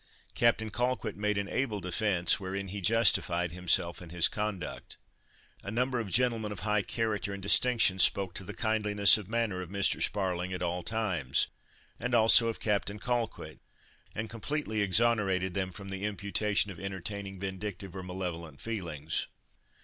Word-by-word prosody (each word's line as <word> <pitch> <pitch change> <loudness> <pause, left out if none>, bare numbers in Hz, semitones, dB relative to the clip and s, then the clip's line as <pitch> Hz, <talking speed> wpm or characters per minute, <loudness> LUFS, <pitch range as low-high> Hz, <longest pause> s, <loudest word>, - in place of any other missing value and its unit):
Captain 110 -2 +2
Colquitt 120 -2 -1
made 105 0 -1
an 100 -1 -1
able 115 -4 -1
defence, 90 0 +1
wherein 95 0 -4
he 100 +1 -5
justified 90 -5 +3
himself 85 -1 +1
and 85 -2 -11
his 85 -1 +4
conduct. 105 -3 -5 0.7
A - - -6
number 125 +3 0
of 110 -4 -4
gentlemen 115 -1 +1
of 105 - -6
high 105 -1 +1
character 105 -3 -2
and 100 - -10
distinction 110 -2 +5
spoke 95 0 +4
to - - -4
the - - -8
kindliness 105 -2 +4
of 100 -2 -10
manner 115 -5 -1
of 90 - -8
Mr. 100 0 +1
Sparling 95 -2 0
at 90 - -3
all 90 +1 -1
times, 90 - 0 0.5
and 125 0 -1
also 115 +1 +6
of 115 - -3
Captain 105 -1 -1
Colquitt, 120 +2 -3 0.6
and 110 +1 -3
completely 115 -1 -3
exonerated 95 -2 +2
them 95 -1 -1
from 95 +2 -9
the 95 0 -5
imputation 100 0 0
of 85 - -10
entertaining 95 +1 -5
vindictive 95 0 -5
or 95 - -5
malevolent 90 -5 -6
feelings. 85 -9 -3
100 Hz, 155 wpm, -30 LUFS, 95-110 Hz, 0.7 s, also